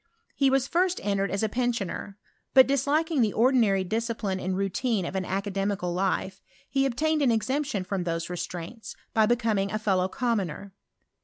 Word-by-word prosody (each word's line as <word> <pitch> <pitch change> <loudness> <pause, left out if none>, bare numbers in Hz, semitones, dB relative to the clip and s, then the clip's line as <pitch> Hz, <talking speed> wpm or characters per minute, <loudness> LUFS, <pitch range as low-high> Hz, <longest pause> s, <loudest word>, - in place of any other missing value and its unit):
He 275 -1 +3
was 265 0 +2
first 360 +3 +1
en 200 -1 0
tered 195 - 0
as. 200 +2 -1
a - - +3
pensioner; 215 -4 -2 0.4
but 260 -1 +9
disliking 285 +3 +1
the 215 -3 +2
ordinary 225 -5 +3
dis 225 +5 -1
cijriiiie 205 -5 -3
and 185 +1 -1
routine 195 +1 0
of 190 - -5
an 190 -1 -1
academicallife, 195 -1 -1 0.3
he 275 0 +1
obtained 305 +5 0
an.cxemption 260 -3 0
rfrom 190 -1 -2
those 165 -1 -2
restraints, 180 +5 -6 0.2
by 220 -1 +4
becoming 220 -4 +1
a. 215 - 0
fidiow 190 -3 +1
commoner. 200 -6 -2
210 Hz, 160 wpm, -27 LUFS, 190-255 Hz, 0.4 s, but